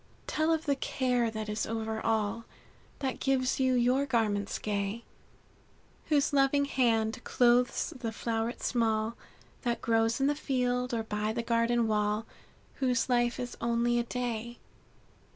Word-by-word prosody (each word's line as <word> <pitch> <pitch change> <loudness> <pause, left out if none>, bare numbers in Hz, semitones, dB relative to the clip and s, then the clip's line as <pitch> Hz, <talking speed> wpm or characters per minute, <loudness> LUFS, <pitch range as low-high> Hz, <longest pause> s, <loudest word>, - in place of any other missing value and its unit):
"Tell 315 +1 +1
of 320 0 0
the 285 -2 +2
care 250 -3 0
that 220 -1 -5
is 210 +1 -2
over 220 0 -3
all 220 0 0 0.6
That 265 -2 -2
gives 265 -1 +1
you 260 -1 +3
your 250 +3 +2
garments 210 -5 0
gay; 205 +2 -2 1.0
Whose 295 -2 +2
loving 280 +1 +3
hand 235 -3 +1
clothes 245 +6 +2
the 240 -4 -4
floweret 225 +1 -3
small 225 -1 +1 0.5
That 240 -2 -1
grows 225 0 +1
in 270 - +2
the 290 - +3
field, 250 -3 -1
or 230 -2 -1
by 210 0 -2
the 235 0 -2
garden 230 0 +2
wall, 210 0 0 0.5
Whose 250 -2 +1
life 240 -1 +2
is 245 -1 -4
only 235 +1 +1
a - - +1
day. 240 -1 -4
235 Hz, 145 wpm, -30 LUFS, 225-255 Hz, 1.0 s, you